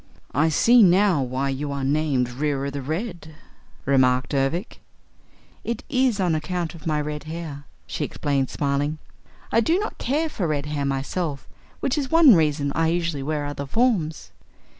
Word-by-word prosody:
"I 155 +4 +3
see 235 +10 +5
now 185 -4 +5
why 130 +2 -1
you 140 +2 -3
are 140 -1 -3
named 140 -2 +1
Reera 140 +1 -2
the 140 0 -4
Red," 160 - -5 0.5
remarked 130 -1 +2
Ervic. 140 - -1 0.8
"It 235 0 -3
is 255 -5 +2
on 180 -3 +2
account 165 +1 -2
of 165 -1 -9
my 155 -1 +1
red 150 0 -4
hair," 155 -3 -6 0.2
she - - -4
explained 140 -2 -1
smiling. 145 +2 -1 0.5
"I 230 - +4
do 325 +10 +2
not 420 +2 -4
care 300 +5 0
for 195 - -3
red 145 -2 -1
hair 150 -2 -2
myself, 140 +2 -3 0.3
which 275 +3 0
is 270 -2 -3
one 325 -6 +7
reason 150 -4 +2
I 165 0 +1
usually 170 -3 -1
wear 145 +1 -2
other 140 -1 -5
forms." 195 - 0
155 Hz, 160 wpm, -23 LUFS, 140-180 Hz, 0.8 s, one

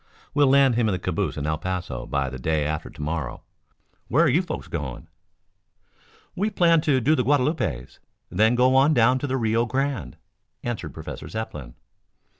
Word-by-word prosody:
We'll 145 -1 +4
land 135 -1 +5
him 115 -1 +1
in - - 0
the - - 0
calaboose 90 -2 -2
in 70 - -3
El 75 0 -1
Paso 90 -8 -4
by 70 -2 -1
the 65 - -7
day 75 +2 0
after 75 +1 -3
to - - -11
morrow. 75 -3 -4 0.6
Where 160 +8 +3
are - - +4
you 165 +8 +3
folks 185 - -6
going?" - - -5 1.3
"We 200 +4 0
planned 170 -5 +3
to 140 -4 +3
do 135 +6 +3
the 125 - +2
Guadalupes, 135 - 0 0.3
then 110 +6 +3
go 130 +1 +4
on 140 +3 +5
down 125 +3 +4
to 145 - -3
the 130 0 -1
Rio 115 0 +1
Grande," 135 -7 -2 0.5
answered 110 -11 -4
Professor - - -7
Zepplin. 75 - -6
120 Hz, 180 wpm, -24 LUFS, -, 1.3 s, land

